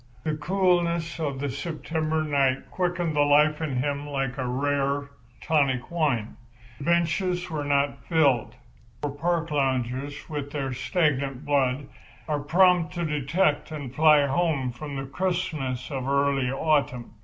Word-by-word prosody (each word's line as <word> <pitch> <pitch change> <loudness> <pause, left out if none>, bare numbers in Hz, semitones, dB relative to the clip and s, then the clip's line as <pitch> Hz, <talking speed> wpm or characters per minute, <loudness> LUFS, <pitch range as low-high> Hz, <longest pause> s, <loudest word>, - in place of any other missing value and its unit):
The 155 -1 -1
coolness 170 0 +1
of 140 -4 -2
the 140 0 -2
September 155 +2 -2
night 135 -3 0
quickened 175 -3 -1
the - - +1
life 150 +2 +4
in 150 -5 -2
him 140 +3 -1
like 135 -3 -2
a 130 - -1
rare, 140 +2 -1 0.3
tonic 140 -6 +1
wine. 145 -10 0 0.4
The 140 - -6
benches 170 +2 +1
were 150 -2 -2
not 140 -1 0
filled; 145 -8 +2 0.5
for 145 - -1
park 165 +2 -1
loungers, 135 0 -1
with 145 -3 -4
their 135 -3 -3
stagnant 140 -3 0
blood, 140 -1 +1 0.4
are 150 -1 0
prompt 180 +2 +3
to 170 -1 -1
detect 150 +1 +1
and 145 -5 -6
fly 150 -1 +5
home 140 -3 0
from 140 +4 -7
the 135 0 -4
crispness 150 -5 -2
of 130 -2 -3
early 140 -2 +2
autumn. 135 -5 0
145 Hz, 145 wpm, -26 LUFS, 135-160 Hz, 0.5 s, fly